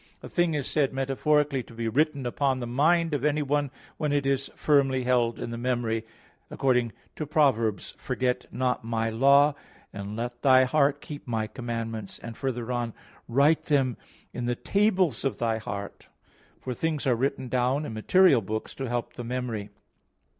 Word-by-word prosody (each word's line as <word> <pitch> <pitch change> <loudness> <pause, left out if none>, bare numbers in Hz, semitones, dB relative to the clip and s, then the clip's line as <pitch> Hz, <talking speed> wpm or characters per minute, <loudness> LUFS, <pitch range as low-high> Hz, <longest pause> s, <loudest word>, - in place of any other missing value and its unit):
A - - -8
thing 175 -3 +1
is 145 -3 -1
said 140 -3 +1
metaphorically 135 +1 +1
to 115 - -14
be 115 0 -3
written 140 +3 +1
upon 130 +1 0
the 120 - -3
mind 160 +7 +2
of 140 -3 -1
anyone 145 -1 +1 0.3
when 150 -2 -1
it 145 -1 +1
is 135 0 0
firmly 135 -3 +2
held 120 -2 +1
in - - -4
the 115 - -5
memory, 120 -2 -1 0.5
according 125 -4 +1 0.3
to 155 - -4
Prov. 145 -5 +4
3:3: 110 -4 -3
"Forget 125 -1 -1
not 125 -1 -1
My 115 0 -1
Law, 140 +5 +5 0.4
and 100 +1 -6
let 120 +1 -5
thy 130 -2 +6
heart 140 +2 +2
keep 145 -3 -9
My 110 -2 -1
commandments," 115 -3 -5
and 115 -1 -8
further 125 -2 -3
on, 120 -2 -2 0.3
"Write 140 +6 +3
them 135 -5 +2 0.4
in 125 - -4
the 120 0 0
tables 190 - +1
of 135 - -1
thy 115 -1 0
heart." 100 -2 -7 0.5
For 130 - -4
things 155 +2 -2
are 130 - +4
written 130 +2 -1
down 130 +4 0
in 110 - -6
material 140 - +4
books 110 +2 -4
to 135 -2 -5
help 120 0 -3
the 120 - -7
memory. 120 -4 -3
130 Hz, 175 wpm, -27 LUFS, 115-145 Hz, 0.5 s, thy